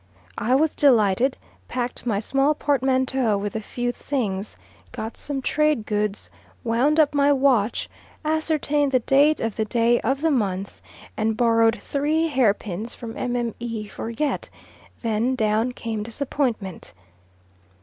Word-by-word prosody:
I 250 +4 +2
was 310 +3 +2
delighted, 245 -1 +3 0.3
packed 245 0 -3
my 205 -4 +1
small 275 +7 +1
portmanteau 260 -5 +1
with 205 +1 -4
a 220 - -2
few 245 +3 -3
things, 215 - -3 0.3
got 220 +1 -6
some 275 -2 -4
trade 300 -7 +1
goods, 210 -1 -2 0.3
wound 255 +7 +2
up 300 -1 +4
my 285 0 +4
watch, 260 -6 +2 0.4
ascertained 305 -2 +1
the - - +6
date 285 +5 +4
of 225 -2 -3
the 220 - +1
day 235 +2 +2
of 270 +4 0
the 325 0 +2
month, 200 -6 -2 0.3
and 220 0 0
borrowed 230 -1 +3
three 305 +7 0
hair 250 -8 +3
pins 210 +3 -6
from 235 -2 -7
Mme. 240 -2 -2 0.4
Forget, 240 +6 -3 0.5
then 230 +3 +1
down 220 +1 +1
came 225 -3 -4
disappointment. 230 - -3
245 Hz, 135 wpm, -23 LUFS, 220-280 Hz, 0.5 s, the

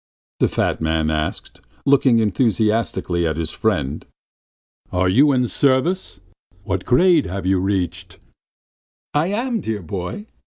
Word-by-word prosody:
the - - +3
fat - - -1
man 80 -1 0
asked, 75 0 -4 0.2
looking 135 -3 +4
enthusiastically 105 -5 0
at 80 -1 -2
his 80 -1 -3
friend. 80 -10 -2 0.8
"Are 90 +1 +1
you 140 +10 +4
in 125 -2 +2
the - - -1
service? 140 - 0 0.4
What 95 -3 -3
grade 165 +4 +4
have 95 +1 -5
you 95 0 +2
reached?" 95 -1 -2 1.0
"I 150 +3 +1
am, 230 +4 -1
dear 105 -4 -4
boy! 95 - -5
105 Hz, 130 wpm, -20 LUFS, 90-135 Hz, 1.0 s, looking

